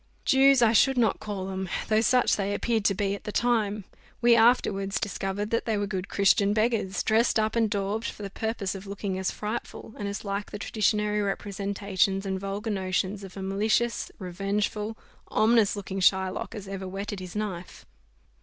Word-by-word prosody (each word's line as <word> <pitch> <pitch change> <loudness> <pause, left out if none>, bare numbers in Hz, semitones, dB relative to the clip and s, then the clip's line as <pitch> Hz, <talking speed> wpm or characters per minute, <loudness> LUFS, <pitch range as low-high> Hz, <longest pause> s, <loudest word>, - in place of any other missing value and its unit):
Jews 270 -1 +5
I 225 -1 +5
should 270 +3 +4
not 230 -3 +2
call 200 -3 -4
them; 190 -1 -4 0.2
though 215 0 +3
such 250 +2 +3
they 200 0 -1
appeared 225 -2 0
to 195 - +3
be 200 0 0
at 200 - -6
the 210 - -5
time: 215 -3 +1 0.4
we 240 0 +5
afterwards 210 -4 +3
discovered 205 0 -3
that 230 - 0
they 220 -2 0
were 205 - 0
good 190 -2 -4
Christian 200 +1 +3
beggars, 220 -3 0
dressed 225 +2 +3
up 215 +1 0
and 225 -2 +2
daubed, 205 +2 -2
for 210 - -7
the 200 - -5
purpose 220 -3 -2
of 195 0 -8
looking 200 -1 -3
as 190 - 0
frightful, 220 +1 -5
and 205 - -3
as 200 +1 -5
like 200 +1 -3
the - - -6
traditionary 210 0 0
representations 200 -1 -1
and 190 -1 -2
vulgar 200 +3 -3
notions 190 +1 -1
of 190 0 -10
a 190 - -5
malicious, 215 +5 0
revengeful, 205 +3 -2 0.3
ominous 220 -2 +3
looking 195 -1 -5
Shylock 190 +2 +1
as 205 -3 -7
ever 195 -1 -5
whetted 200 +1 -5
his 185 0 -8
knife. 195 -5 -5
205 Hz, 180 wpm, -27 LUFS, 195-220 Hz, 0.4 s, Jews